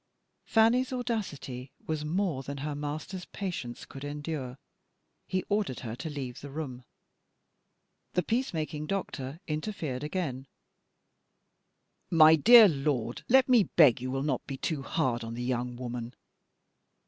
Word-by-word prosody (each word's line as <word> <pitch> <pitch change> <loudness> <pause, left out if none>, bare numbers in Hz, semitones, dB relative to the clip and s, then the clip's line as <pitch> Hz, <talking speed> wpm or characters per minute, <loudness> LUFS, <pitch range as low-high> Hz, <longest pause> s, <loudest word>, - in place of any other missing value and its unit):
Fanny's 235 +4 +3
audacity 190 - -4
was 155 -1 -2
more 165 -2 -1
than 140 +1 -6
her 150 - -2
master's 150 +6 -5
patience 170 -12 -5
could 135 - -10
endure. 145 -3 -4 0.7
He 185 -1 -1
ordered 205 - -1
her 115 -2 -5
to 150 +5 -5
leave 135 -5 -6
the 145 - -8
room. 135 -4 -6 1.3
The 180 - +1
peace 245 +9 0
making 155 -2 -3
doctor 155 -5 -4
interfered 155 -5 -3
again: 150 -5 -3 1.6
"My 160 -1 +8
dear 225 +7 +9
lord, 135 - -1
let 265 +1 +6
me 240 -6 +5
beg 140 -8 +6
you 130 - -3
will 135 +1 -1
not 140 -4 -1
be 135 - -4
too 150 +1 -2
hard 130 -5 -1
on 115 0 -5
the 120 - -4
young 125 0 -2
woman." 120 -1 -5
150 Hz, 135 wpm, -29 LUFS, 130-180 Hz, 1.6 s, dear